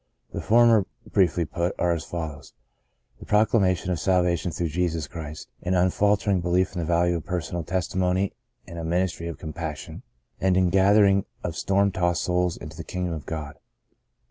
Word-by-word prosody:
The - - -3
former 115 -3 +5 0.2
briefly 90 -3 +2
put, 85 +4 -2
are 90 - +1
as 85 -2 -1
follows: 80 -4 -6 0.7
The - - -11
proclama 105 -3 +3
tion 95 - -4
of 85 - -1
salvation 90 -2 +1
through 85 +1 -2
Jesus 85 -1 -1
Christ, 75 -2 -8
an 90 +1 0
unfaltering 100 +1 +2
belief 90 +2 +1
in 90 - -4
the 85 - -1
value 85 +1 +2
of 80 - -7
personal 85 -1 -3
testimony 95 +2 0 0.3
and 85 -1 -8
a - - -4
ministry 85 0 -1
of 85 - -5
compassion, 80 -2 -6 0.4
and 95 -1 +2
the - - +4
ingathering 100 +2 +4 0.2
of 85 - -3
storm 100 +3 +2
tossed 90 -3 0
souls 90 -1 0
into - - -9
the - - -6
kingdom 90 -2 -3
of 80 -3 -7
God. 75 -3 -5
90 Hz, 170 wpm, -25 LUFS, 85-95 Hz, 0.7 s, former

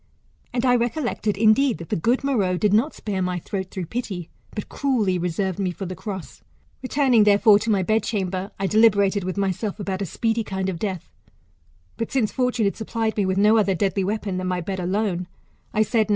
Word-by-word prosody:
And 245 +1 -1
I 250 - +5
recollected, 235 -3 -1
indeed, 230 +4 +4
that 170 - -9
the - - 0
good 235 - +1
Meroe 205 -10 +1
did 205 +1 +2
not 235 +9 +2
spare 200 -3 -3
my 180 -1 -1
throat 190 +2 -4
through 185 -2 -5
pity, 190 -4 -5 0.2
but 210 - -6
cruelly 220 -10 0
reserved 180 +2 -2
me 190 -2 0
for 185 +2 -5
the 185 - -5
cross. 190 0 -7 0.4
Returning, 255 -4 +3
therefore, 205 0 +6
to 225 - -3
my 200 -3 +2
bedchamber, 195 -2 -1
I 195 - 0
deliberated 200 -2 +4
with 185 +1 -4
myself 200 +2 -2
about 195 -1 -3
a 195 - -2
speedy 225 +6 -1
kind 190 -2 -3
of 175 -3 -4
death; 190 -4 -4 0.9
but 230 - -3
since 250 -6 +1
fortune 250 -3 0
had 200 - 0
supplied 220 0 -2
me 200 -3 +1
with 190 0 0
no 210 +3 +5
other 200 -3 +2
deadly 195 +1 0
weapon 200 -1 -2
than 185 0 -3
my 180 0 -1
bed 190 +2 -4
al^ne, 185 -1 -1 0.4
I 215 - +3
said. 220 0 +1
205 Hz, 200 wpm, -23 LUFS, 185-225 Hz, 0.9 s, therefore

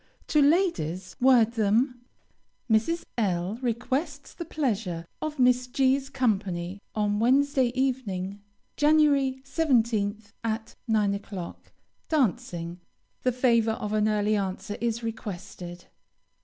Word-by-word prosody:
To 300 - +4
ladies, 280 - +1
word 245 -3 +5
them: 235 +3 +1 0.7
Mrs. 245 +10 +2 0.2
L 190 +1 0
requests 265 +5 -2
the 340 - -6
pleasure 210 - -2 0.2
of 310 -1 -3
Miss 250 -1 +3
G 265 +1 +3
's 275 0 -5
company 200 -8 -1
on 205 -1 +1
Wednesday 265 +2 +3
evening, 205 -7 -2 0.4
Jan. 300 +1 +5 0.5
17th, 225 -8 0
at 225 0 -3
9 210 -3 +2
o'clock. 200 -3 -7 0.4
Dancing. 190 - -1 0.4
The 255 - +2
favor 235 -3 +3
of 210 -1 -4
an 215 0 +2
early 210 0 +2
answer 200 +1 -3
is 235 0 -1
requested. 185 -5 -6
225 Hz, 115 wpm, -27 LUFS, 200-260 Hz, 0.7 s, word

